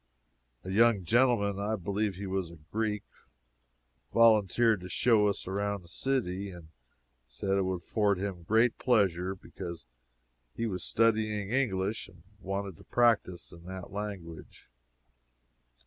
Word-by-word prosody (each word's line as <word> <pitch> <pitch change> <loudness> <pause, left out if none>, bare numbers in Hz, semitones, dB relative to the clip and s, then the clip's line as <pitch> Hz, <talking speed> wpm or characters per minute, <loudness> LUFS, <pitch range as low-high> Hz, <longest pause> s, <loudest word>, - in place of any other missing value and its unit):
A 95 - -5
young 110 -1 +4
gentleman 115 -3 +3
(I 105 +2 0
believe 100 +1 -2
he 100 +2 -6
was 95 -2 -2
a 85 - -12
Greek,) 105 -2 -1 1.1
volunteered 110 -1 +4
to 90 - -8
show 105 +3 +3
us 100 0 -2
around 100 0 -2
the - - -17
city, 100 -4 -2
and 85 -4 -11 0.6
said 100 - -4
it 95 0 +3
would 90 -2 -2
afford 105 -3 +1
him 95 -2 -4
great 110 +7 +2
pleasure, 95 -6 +2
because 85 -5 -8 0.7
he 115 - -2
was 95 -5 -3
studying 110 -2 +1
English 110 -5 0
and 85 -3 -18 0.2
wanted 95 -3 -5
practice 115 -8 +2
in 85 0 -14
that 95 0 -8
language. 100 -6 -7
100 Hz, 130 wpm, -30 LUFS, 95-110 Hz, 1.1 s, young